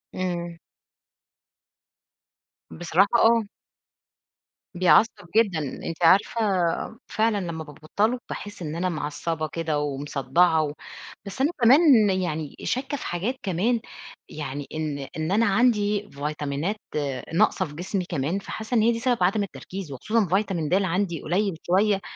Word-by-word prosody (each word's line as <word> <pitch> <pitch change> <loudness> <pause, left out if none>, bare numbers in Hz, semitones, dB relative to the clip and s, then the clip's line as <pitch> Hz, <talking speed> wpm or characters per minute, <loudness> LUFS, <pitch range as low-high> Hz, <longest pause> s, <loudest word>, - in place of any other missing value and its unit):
إمم. 175 -2 -3 2.1
بصراحة 175 +3 +2
آه. 230 -1 +5 1.3
بيعصّب 185 +2 +3
جدًا. 200 -8 +3
أنتِ 160 +4 -5
عارفة 190 +7 +4 0.7
فعلًا 220 -1 +1
لمّا 170 -4 -4
بابطّله 160 - -1
باحسّ 205 -3 -7
إن 155 -1 -4
أنا 180 +2 0
معصّبة 155 0 -3
كده 160 -1 -2
ومصدّعة 145 +3 +1
و 145 -1 -3 0.5
بس 200 +6 -5
أنا 290 - +3
كمان 255 -4 +6
يعني 160 -6 -2
شاكّة 270 +3 -2
في - - -8
حاجات 195 +10 -2
كمان، 205 +6 +1 0.5
يعني 145 -1 -5
إن 155 -2 -3 0.2
إن 160 +3 -2
أنا 225 +3 +3
عندي 210 -1 +2
فيتامينات، 150 +5 -3 0.6
ناقصة 185 +2 +3
في 150 -3 -11
جسمي 185 +2 -3
كمان، 165 +2 -2
فحاسّة 220 +4 -5
إن 220 - +4
هي 230 +2 +4
دي 230 - -2
سبب 245 -6 +1
عدم 200 +3 +2
التركيز، 190 -4 -7
وخصوصًا 215 - 0
فيتامين 185 -4 0
د - - -1
عندي 185 -3 0
قليل 185 +1 0
شويّة، 195 +2 +3
180 Hz, 130 wpm, -25 LUFS, 155-210 Hz, 2.1 s, كمان